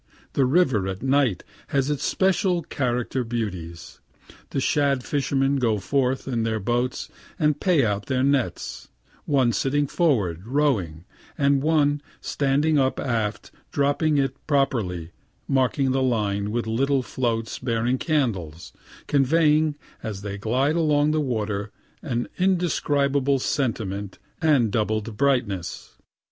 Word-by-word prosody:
The 135 - +3
river 130 - +2
at 95 +2 -5
night 135 -8 +2 0.2
has 140 +1 0
its 145 - -2
special 185 -2 +1
character 125 -3 -1
beauties. 95 -8 -5 0.5
The - - -2
shad 140 -1 +1
fishermen 140 0 0
go 115 -5 +1
forth 130 +6 0
in 120 -3 -1
their 110 -1 -1
boats 120 +5 -1 0.3
and 150 -4 +1
pay 170 -9 +3
out 105 -1 -2
their 130 -1 +1
nets 140 -2 -1 0.4
one 130 -5 +3
sitting 145 +4 +1
forward, 110 - 0
rowing, 110 - 0 0.3
and 140 -1 +3
one 145 -1 +2 0.2
standing 145 +2 +1
up 130 -1 +1
aft 110 -5 -2 0.2
dropping 145 +2 +1
it 135 -2 +1
properly 110 - 0 0.4
marking 135 0 +1
the 135 +1 +1
line 105 -5 0
with 115 +2 -1
little 130 +4 +1
floats 115 -3 -2
bearing 120 +1 0
candles, 100 - -2 0.3
conveying, 150 +2 +3 0.3
as 100 -3 -5
they 100 -1 -4
glide 130 +8 +1
over 150 -2 +3
the 155 0 +1
water, 105 -6 -2 0.3
an 120 -5 -2
indescribable 145 -7 +1
sentiment 110 -8 -2 0.2
and 140 -9 +3
doubled 110 0 -1
brightness. 120 -9 -1
130 Hz, 125 wpm, -24 LUFS, 110-145 Hz, 0.5 s, The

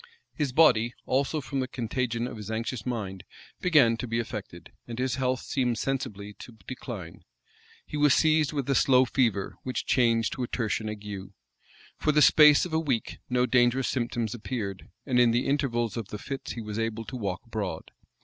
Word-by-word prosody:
His 145 -4 -1
body, 120 -6 +4
also, 140 +4 0
from 140 0 -3
the 130 - -1
contagion 120 -1 -2
of 125 -2 -6
his 105 0 -8
anxious 115 0 -3
mind, 100 -6 -4 0.4
began 145 -10 +4
to 125 - -4
be 115 0 -1
affected, 105 -6 -6 0.2
and 115 -1 -6
his 130 0 0
health 130 -1 0
seemed 125 -4 -1
sensibly 110 -7 -3
to 115 -2 -11
decline. 110 -9 -7 0.6
He 150 - -5
was 145 -1 +5
seized 155 -2 +3
with 140 -4 -3
a 140 - +2
slow 130 -1 +5
fever, 115 -6 0
which 130 - -3
changed 115 -3 +2
into - - -5
a 125 - -1
tertian 110 -2 -2
ague. 100 -2 -7 0.7
For 155 - +2
the 150 0 +5
space 150 0 +7
of 175 - -7
a 160 - +3
week, 135 -8 -2
no 125 0 +2
dangerous 125 +1 +3
symptoms 120 -3 -2
appeared: 105 -5 -5 0.2
and 125 -3 +2
in 120 -1 +6
the 120 +2 +1
intervals 120 -6 0
of 115 -4 -4
the 105 - -6
fits 135 +5 -6
he 115 - -6
was 105 0 -5
able 115 0 -2
to 130 - -7
walk 100 -7 -3
abroad. 100 -8 -5
120 Hz, 190 wpm, -27 LUFS, 110-135 Hz, 0.7 s, space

